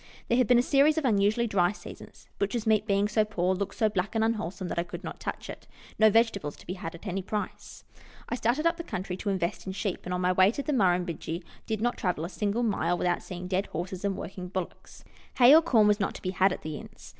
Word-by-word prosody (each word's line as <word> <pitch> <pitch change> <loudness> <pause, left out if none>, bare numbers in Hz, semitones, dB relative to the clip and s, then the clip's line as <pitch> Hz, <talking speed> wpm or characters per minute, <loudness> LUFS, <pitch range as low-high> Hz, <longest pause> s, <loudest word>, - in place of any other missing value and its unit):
There 235 - +3
had 250 - +3
been 245 - +5
a 240 - +4
series 290 +4 +4
of 315 - 0
unusually 215 0 +2
dry 185 -5 +2
seasons; - - -12
butcher's 210 +3 -1
meat 215 -1 +2
being 200 0 +2
so 215 +1 +2
poor, 190 -4 0
looked 195 +1 -3
so 220 - +2
black 205 +1 -2
and 220 - +2
unwholesome 195 -5 -2
that - - -2
I - - +1
could 175 +1 -8
not - - -7
touch - - -5
it. - - -9 0.3
No 220 0 +7
vegetables 205 -9 +1
to - - -16
be 180 - -4
had 170 -3 -6
at 170 - -13
any 195 -1 -2
price. 205 +3 -5 0.4
I - - -4
started 245 +6 0
up 335 0 +2
the 335 - -5
country 185 - -4
to 205 - -3
invest 185 -1 -2
in 190 - -3
sheep, 195 -1 -2
and 180 - -5
on 180 0 -1
my 180 0 +2
way 185 +1 +5
to 280 - -4
the 300 - -1
Murrumbidgee 175 - 0 0.2
did 220 -1 -2
not 240 +1 0
travel 180 -4 -1
a - - -5
single 210 +4 -1
mile 175 -6 +1
without 175 -1 0
seeing 180 0 -7
dead 190 +2 -1
horses 180 +3 -5
and 200 -1 -1
working 185 -1 -6
bullocks. 185 -1 -7 0.3
Hay 250 +2 +8
or 320 - +8
corn 240 -10 +4
was 210 0 +3
not 195 - -1
to - - -9
be 185 - -1
had 190 +1 +3
at - - -5
the 155 -1 -4
inns. - - -12
200 Hz, 255 wpm, -28 LUFS, 180-225 Hz, 0.4 s, Hay